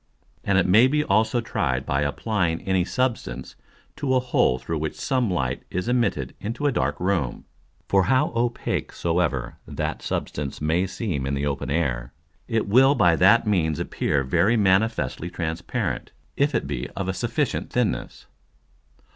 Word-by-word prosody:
And 100 - +2
it 95 - +3
may 110 +7 +6
be 150 +2 +1
also 110 +2 +2
tried 115 - -1
by 70 +1 0
applying 85 +3 -1
any 95 -2 +1
substance 130 +4 -2 0.4
to 135 -2 0
a - - +5
hole 125 - +2
through 75 +6 -4
which 80 0 -3
some 130 -4 0
Light 65 -9 -1
is 90 +3 -3
immitted 115 - 0
into 115 +7 -4
a 145 - +4
dark - - -1
Room. 90 -8 -1 0.4
For 95 -2 +3
how 130 0 +3
opake 120 0 -1
soever 85 -7 -1
that - - -3
Substance 70 -2 -4
may 80 +5 +1
seem 90 - -3
in 70 - -1
the 70 +1 -1
open 70 -1 -2
Air, 70 -6 -1 0.3
it 115 -3 0
will 135 +7 +5
by 90 -9 +4
that 105 +7 +5
means 80 -8 +1
appear 70 -2 -1
very 85 - +2
manifestly 95 - +1
transparent, 85 -1 -3 0.2
if 140 -1 +1
it - - 0
be - - -4
of 95 -1 -3
a 95 - 0
sufficient 120 +6 -1
thinness. 120 -6 -2
95 Hz, 160 wpm, -24 LUFS, 80-115 Hz, 0.4 s, may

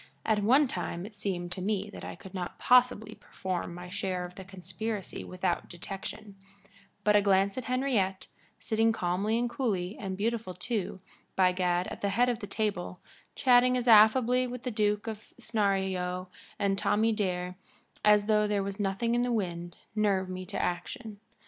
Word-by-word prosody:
At 215 -2 +2
one 265 +8 +5
time 175 -4 -4
it 215 - -10
seemed 185 -4 -3
to 185 - -3
me 205 +1 -1
that - - -9
I - - -6
could 190 - -13
not 180 -2 -5
possibly 245 -4 +4
perform 185 -4 -5
my 180 0 -8
share 185 -1 -2
of 180 - -10
the 190 - -9
conspiracy 190 +3 -5
without 185 -1 -2
detection, 195 +3 -7 0.7
but 210 0 +4
a 205 - +6
glance 195 0 +3
at 255 - -4
Henriette, 250 -8 0 0.3
sitting 225 +1 +2
calmly 195 +3 0
and 240 +1 +1
coolly, 210 -7 -2
and 190 -2 -4
beautiful 220 -3 -2
too, 190 -1 -3 0.3
by 185 -1 +4
gad, 180 -1 +1
at - - -8
the 200 - +1
head 240 +5 +3
of 240 -2 -1
the 205 - -6
table, 195 -3 -2 0.4
chatting 250 -1 +5
as 250 0 -2
affably 240 +3 +6
with 250 0 -7
the 250 - -2
duke 210 -1 +1
of 220 -2 -7
Snarleyow 190 -4 -1 0.3
and 195 -1 +1
Tommy 220 +2 +2
Dare 180 -4 -2 0.5
as 210 -1 +5
though 210 -1 +3
there 205 -1 0
was 200 +1 -5
nothing 205 +4 0
in 240 - +2
the 245 0 0
wind, 175 -6 -3 0.2
nerved 195 -3 +1
me 185 0 -6
to - - -4
action. 205 +4 -3
200 Hz, 175 wpm, -29 LUFS, 185-225 Hz, 0.7 s, a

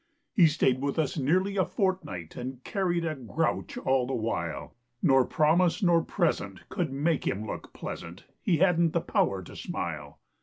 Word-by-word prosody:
He 180 -7 +6
stayed 135 -4 +2
with 140 +2 -1
us 155 -4 0
nearly 185 +8 +1
a 190 - +4
fortnight 180 - -2
And 125 +1 -6
carried 175 -4 0
a 160 - -1
grouch 125 -9 -2
all 130 -1 +1
the 135 - -1
while, 85 -9 -3 0.3
Nor 135 -5 +5
promise 165 +4 +2
nor 170 -2 +5
present 155 - -1
could 170 -6 -2
make 150 +4 0
him 105 +2 -1
look - - -6
pleasant; 85 +2 -7 0.2
He 180 -6 +2
hadn't 170 -2 +3
the 170 - +2
power 95 - 0
to - - -12
smile. 75 -4 -5
150 Hz, 165 wpm, -28 LUFS, 115-175 Hz, 0.3 s, He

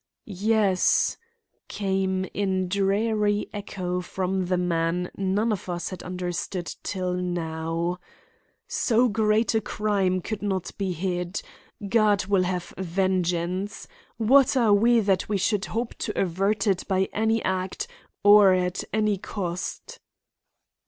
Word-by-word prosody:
"Yes," 205 -1 +2 0.5
came 190 -1 -1
in 190 -2 0
dreary 205 +2 +1
echo 185 -3 -3
from 185 0 -2
the 180 0 +1
man 175 0 0
none 195 +4 0
of 195 -3 -4
us 175 -1 -3
had 185 - -7
understood 180 0 -4
till 185 -2 -2
now; 170 -1 -2 0.7
"so 240 +1 +2
great 220 +1 +2
a 220 - +2
crime 195 -4 0
could 210 +3 -5
not 190 -3 -2
be 195 -2 -1
hid. 180 +2 -3 0.4
God 210 -2 +3
will 195 -2 +2
have 180 -1 -3
vengeance. 185 +1 -1 0.3
What 265 +4 +4
are 225 -4 +4
we 230 +3 +4
that 195 -2 +1
we 205 - +1
should 195 +1 0
hope 230 +1 -3
to 210 - -3
avert 195 +3 0
it 195 -3 +1
by 190 -1 +1
any 220 +1 +1
act 185 0 -2 0.4
or 205 -2 +8
at 180 0 -1
any 215 -2 +1
cost?" 180 -3 -5
190 Hz, 125 wpm, -25 LUFS, 180-210 Hz, 0.7 s, or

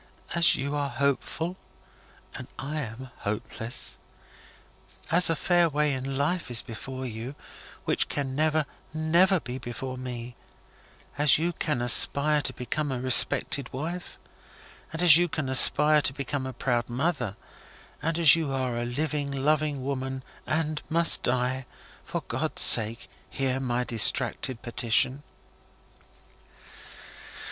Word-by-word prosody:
"As 170 0 +4
you 140 +2 -3
are 145 -1 -2
hopeful, 140 +6 -2 0.8
and 130 - -9
I 150 +3 -5
am 125 +1 -8
hopeless; 115 +3 -5 1.1
as 175 +1 +6
a 165 - +1
fair 175 +1 +2
way 150 -1 0
in 135 +1 -4
life 165 +4 -1
is 120 -2 +1
before 130 +3 -8
you, 120 +3 -7 0.5
which - - -1
can 135 -2 -4
never, 155 0 +1 0.3
never, 170 +4 +2
be 130 -3 -7
before 130 +2 -7
me; 125 -1 -7 0.8
as 150 0 +5
you 170 +3 -1
can 150 -6 -2
aspire 145 +5 +5
to - - -1
become 145 +4 -4
a 130 - -3
respected 130 +1 +2
wife, 165 +7 -6 0.7
and 165 +2 -3
as 165 -3 +9
you 175 0 +2
can 155 -4 -4
aspire 150 +3 +6
to 135 - -1
become 140 -1 -4
a - - -5
proud 120 -2 -2
mother, 125 - -2 0.7
as 165 -1 +5
you 160 -4 -3
are 130 -3 -2
a 120 - -3
living 145 +3 -3
loving 145 0 -1
woman, 130 -1 -4 0.2
and 155 -1 -2
must 170 +1 +3
die; 125 +1 -1 0.4
for - - -5
GOD'S - - -2
sake 110 +2 +6 0.2
hear 130 -1 -2
my 125 -2 -2
distracted 120 +2 -1
petition!" 125 +2 +1
135 Hz, 130 wpm, -26 LUFS, 125-155 Hz, 1.1 s, as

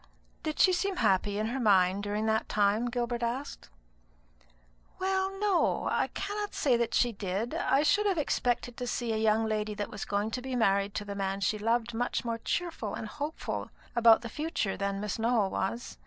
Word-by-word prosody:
"Did 310 -1 -3
she 370 - +6
seem 390 +2 0
happy 200 - +2
in 215 - 0
her 265 +3 -2
mind 195 -4 +4
during 205 +1 -2
that 220 0 0
time?" 210 +3 +2
Gilbert 240 0 -2
asked. 245 +5 -4 1.3
"Well, 385 0 0
no; 400 -3 +1
I - - +1
cannot 410 +1 -4
say 260 -4 +3
that 235 0 0
she 245 - +3
did. 200 +2 -3
I 275 +2 +2
should 410 +6 +3
have 385 -3 +1
expected 245 -4 0
to 250 - -4
see 240 -1 -1
a - - 0
young 220 0 +2
lady 215 -1 -1
that 205 0 -4
was 200 - -5
going 205 +2 -1
to 250 - -3
be 260 0 -4
married 200 -3 +2
to 205 - -3
the 200 - -5
man 195 0 -2
she 215 +1 0
loved 230 +2 0
much 245 +1 -1
more 230 -1 -2
cheerful 320 - -3
and 220 - -5
hopeful 295 +7 -4 0.3
about 230 -1 +6
the - - -4
future 300 - -2
than 200 0 -2
Miss 210 +1 -3
Nowell 225 -4 +2
was. 230 +6 -3
230 Hz, 195 wpm, -30 LUFS, 205-265 Hz, 1.3 s, she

